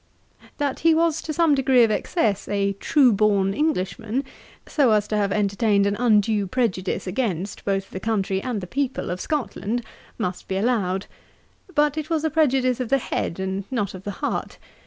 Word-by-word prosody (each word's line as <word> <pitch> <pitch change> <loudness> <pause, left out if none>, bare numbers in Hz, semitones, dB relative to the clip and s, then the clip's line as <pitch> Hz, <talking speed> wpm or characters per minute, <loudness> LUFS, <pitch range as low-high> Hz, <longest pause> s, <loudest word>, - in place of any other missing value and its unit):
That 285 -3 -1
he 330 0 +4
was 325 -1 +2
to 315 - -5
some 320 -1 +3
degree 265 -3 +4
of 225 - +3
excess 215 - 0
a 200 -1 0
true 250 +5 +3
born 200 -2 +2
Englishman, 225 - -1 0.4
so 265 -7 +3
as 210 -1 +2
to 215 - 0
have 205 -1 +1
entertained 200 0 +2
an 200 0 +1
undue 210 -3 +2
prejudice 190 -4 -1
against 195 -2 -2
both 195 -1 -1
the 190 - -5
country 195 -3 -1
and 235 -4 -3
the - - -5
people 265 +1 -2
of 180 - -4
Scotland, 245 -5 -2 0.3
must 180 -5 -4
be 190 - -2
allowed. 195 -4 0 0.7
But 295 0 +2
it 310 +1 -6
was 320 -2 0
a 315 - 0
prejudice 265 -5 +2
of 250 -3 -3
the 275 - +4
head, 190 -8 -3
and 190 +1 -2
not 210 -7 -2
of 185 - -8
the 205 - -4 0.2
heart. - - -3
215 Hz, 180 wpm, -23 LUFS, 195-270 Hz, 0.7 s, he